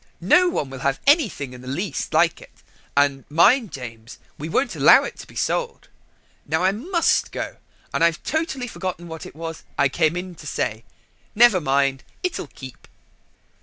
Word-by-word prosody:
No 360 0 +4
one 140 - -3
will 135 - -7
have 135 +1 0
anything 255 - +2
in 125 - -11
the 125 - -12
least 175 +9 -3
like 160 +1 +2
it, - - -17 0.3
and 140 -1 +3
mind, 180 - +4
James, 115 -4 -9 0.2
we 155 +2 -6
won't 270 +11 0
allow - - +7
it - - -6
to - - -10
be - - -16
sold. 480 -1 -2 0.6
Now 160 +2 0
I 190 - +4
must 330 - +1
go, - - -5 0.4
and - - +1
I've 170 0 +2
totally 310 -6 -2
forgotten 185 -5 -5
what 160 -1 -8
it - - -14
was 165 0 -6 0.2
I 140 -1 +3
came 160 +3 +1
in 180 0 -5
to 150 - -9
say: 115 -5 -3 0.5
never 220 -5 +6
mind, 135 -1 +1 0.2
it'll 365 - -2
keep." 130 -2 -12
165 Hz, 175 wpm, -22 LUFS, 140-215 Hz, 0.6 s, allow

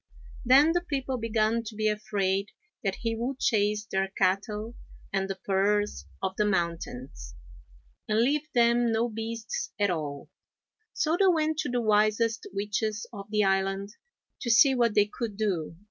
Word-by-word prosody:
Then 275 +5 +6
the 350 +1 +1
people 270 -6 -3
began 225 0 +1
to 220 -1 -8
be 215 0 0
afraid 200 -2 0 0.4
that 195 -2 0
he 230 -1 -1
would 250 +4 -3
chase 210 -3 +1
their 195 -2 -1
cattle 200 +4 -1 0.4
and 195 0 0
the 195 - -2
purrs 205 +2 0 0.2
of 190 0 -1
the 210 - +2
mountains, 195 +6 -3 0.7
and 215 +1 +2
leave 290 +5 +1
them 235 0 +4
no 225 +2 +1
beasts 225 0 -4
at 205 -2 +2
all, 150 -4 -5 0.6
so 320 +2 0
they 390 - +5
went 315 -3 +2
to 305 -3 -1
the 245 -1 0
wisest 215 +1 +2
witches 210 +2 -2
of 200 -1 -8
the 210 0 +2
island, 195 +1 0 0.5
to 235 - -4
see 265 +4 +6
what 235 -4 +2
they 205 - +5
could 210 -1 -5
do. 180 -7 -1
215 Hz, 160 wpm, -28 LUFS, 200-235 Hz, 0.7 s, Then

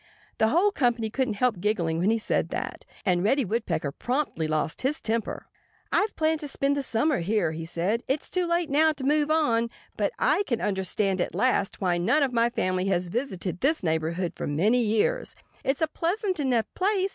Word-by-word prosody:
The 220 - +4
whole 350 - +3
company 240 - 0
couldn't 255 -4 -1
help 225 -3 +1
giggling 175 -5 0
when 185 +4 +2
he 225 - +3
said 220 - -1
that. - - -5 0.2
And 180 -2 +2
Reddy 265 +5 +2
Woodpecker 180 -9 -1
promptly 245 - -2
lost 155 0 -1
his 285 +4 0
temper. 225 0 -2 0.5
"I've 420 +1 +1
planned 315 0 +1
to 295 - -4
spend 280 0 0
the 285 - 0
summer 270 +2 +1
here," 180 -1 +1
he 160 +1 -6
said. 185 +8 0
"It's 275 +3 -1
too 360 -1 -1
late 340 -3 0
now 310 +2 +4
to 280 -3 -8
move 295 +2 +2
on. 235 -8 +2 0.3
But - - +1
I - - +2
can 235 -4 0
understand 190 -1 0
at - - -2
last 215 -6 +1
why 175 -2 +1
none 245 - +3
of 265 -3 0
my 235 0 +3
family 185 -5 -1
has 180 -2 0
visited 190 - -3
this 300 -2 +1
neighborhood 165 +2 -1
for - - -4
many 205 +12 +2
years. 225 - 0 0.3
It's 270 +3 0
a - - +3
pleasant 365 +3 -1
enough 250 -5 +1
place. 390 0 +1
230 Hz, 195 wpm, -26 LUFS, 185-295 Hz, 0.5 s, The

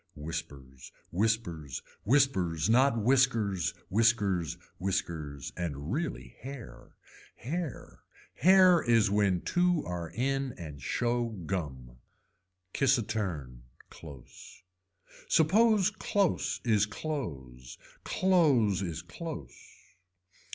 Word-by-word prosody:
Whispers, 70 -4 -7 0.2
whispers. 85 - -1 0.2
Whispers 105 - +2
not 125 0 +4
whiskers, 115 - +2
whiskers, 100 -6 +1 0.2
whiskers 80 -7 -3
and 80 -2 -4
really 165 +4 -4
hair. 135 -2 -10 0.4
Hair. 155 0 -5 0.3
Hair 185 +2 +6
is 115 -4 +3
when 100 -4 +2
two 175 -2 +1
are 85 -2 -4
in 135 +3 -1
and 75 -6 -9
show 120 - 0 0.2
gum. 65 -9 -5 0.8
Kiss 135 -1 +3
a 115 - -1
turn, 80 - -4 0.3
close. 70 +3 -13 0.6
Suppose 205 +5 +4
close 200 -3 0
is 110 -3 +3
clothes, 70 - -6 0.3
clothes 140 - +3
is 85 -4 -4
close. 85 - -7
105 Hz, 90 wpm, -30 LUFS, 80-135 Hz, 0.8 s, Hair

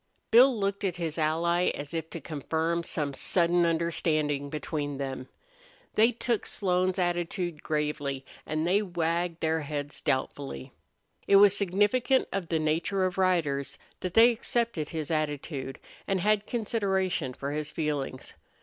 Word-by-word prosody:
Bill 245 +1 +6
looked 200 0 -1
at 185 -3 0
his 165 -2 -3
ally 170 +3 +2
as 145 +1 -6
if 165 -1 -3
to 165 - -6
confirm 160 +3 -2
some 150 -4 -2
sudden 175 +4 +2
understanding 155 -3 0
between 145 -1 -3
them. 135 -1 -5 0.6
They 225 +3 +5
took 235 -1 -2
Slone's 185 -1 +1
attitude 175 -2 -1
gravely 150 -3 -2 0.2
and 155 +1 -2
they 190 +4 +3
wagged 170 -2 -1
their 160 0 +1
heads 145 0 -4
doubtfully.... 130 - -2 0.6
It 200 - +5
was 200 0 +7
significant 205 +7 +2
of 195 -4 -2
the 165 - 0
nature 165 +5 0
of 185 0 -2
riders 160 -7 +1 0.2
that 185 -1 -5
they 230 +2 +8
accepted 230 -8 -1
his 160 -1 -4
attitude 145 -3 -2 0.3
and 195 -1 +1
had 210 +2 +1
consideration 190 - -1
for 140 +1 -4
his 150 0 -3
feelings. 145 -5 -3
170 Hz, 140 wpm, -28 LUFS, 150-190 Hz, 0.6 s, they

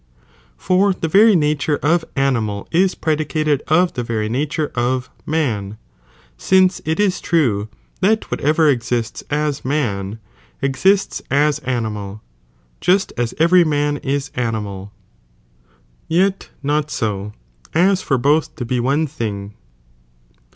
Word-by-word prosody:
For 190 +2 +2
the 165 - -3
very 205 +5 +6
nature 150 -2 +1
of 165 +3 +3
animal 115 -7 0
ia 185 +3 +4
predicated 155 -2 0
of 175 +3 +3
the 125 - -3
very 110 -2 -2
nature 145 +5 -1
of 125 +1 -1 0.2
man, 110 -10 -1 0.6
since 185 -1 +3
it 160 +3 -1
is 195 -3 +1
true 115 - +1 0.3
that 215 +3 +1
whatever 155 +2 +2
exists 120 -4 -1
as 150 -1 -1
man, 110 -8 -2 0.4
exists 140 +10 +1
as 145 +2 +2
animal, 110 -5 -4 0.6
(just 190 +2 +2
aa 120 -1 0
every 175 +3 +5
man 145 -2 0
is 140 +1 -3
animal,) 105 -5 -3 1.2
yet 190 +4 +1
not 150 +1 0
ao, 105 -1 -3 0.4
aa 185 +4 +4
for 180 -8 0
both 145 +5 +1
to 125 - -5
be 125 +1 -1
one 140 +6 +1
ihing. 105 -8 -5
145 Hz, 125 wpm, -19 LUFS, 115-160 Hz, 1.2 s, very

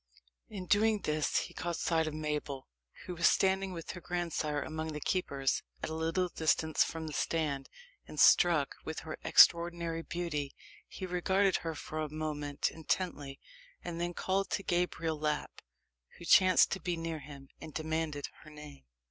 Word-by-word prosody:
In 195 -4 -6
doing 210 +2 +3
this, 150 0 0
he - - -8
caught 175 -1 -3
sight 160 -1 +1
of 155 - -4
Mabel, 150 -3 -3 0.4
who 180 - -5
was 170 0 +3
standing 190 0 +2
with 170 -2 -6
her 180 - -9
grandsire 165 -4 -2
among 160 0 -4
the 150 - -4
keepers, 140 -6 0 0.2
at - - -2
a - - -3
little 165 +3 0
distance 160 -2 +2
from 165 -1 -5
the 155 - -6
stand, 145 -5 -1 0.4
and, - - -7
struck 165 -6 +5
with 160 - -5
her 155 -1 -7
extraordinary 170 -1 +5
beauty, 165 -5 -3 0.3
he 190 - -7
regarded 190 +2 +2
her 165 -1 -4
for 155 +1 -6
a 155 -1 -2
moment 150 -2 -2
intently, 155 -4 -3 0.4
and 170 -1 -4
then 175 0 -2
called 195 +1 0
to 195 - -2
Gabriel 175 -3 -1
Lapp, 150 0 -2 0.6
who 170 - -10
chanced 185 0 +6
to 190 - -1
be 175 -2 -2
near 165 -1 -3
him, 140 -2 -11
and 160 - -8
demanded 155 -2 -2 0.2
her 155 - -13
name. 150 - -12
160 Hz, 165 wpm, -32 LUFS, 150-175 Hz, 0.6 s, chanced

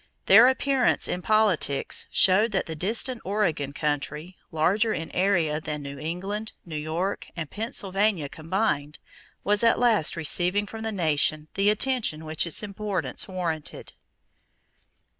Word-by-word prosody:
Their 225 +6 +8
appearance 265 0 +2
in 180 - -3
politics 205 -10 +1
showed 210 +4 +4
that 190 - 0
the 165 - -6
distant 225 - -1
Oregon 180 -8 -1
country, 150 +4 -3 0.2
larger 195 +8 +2
in 165 - -5
area 170 -5 +1
than 150 -1 -5
New 140 0 -7
England, 190 +8 -4
New 165 -3 -7
York, 160 +6 -3
and 160 -4 -5
Pennsylvania 200 -5 0
combined, 155 -2 -2 0.5
was 205 +2 +1
at 230 - +4
last 225 -10 +2
receiving 175 +5 +1
from 220 +2 -8
the 220 0 -2
nation 155 -4 0
the 195 +1 +3
attention 215 -8 0
which 155 +2 -1
its 170 - -2
importance 205 -1 -3
warranted. 170 -5 -5
185 Hz, 135 wpm, -26 LUFS, 155-210 Hz, 0.5 s, Their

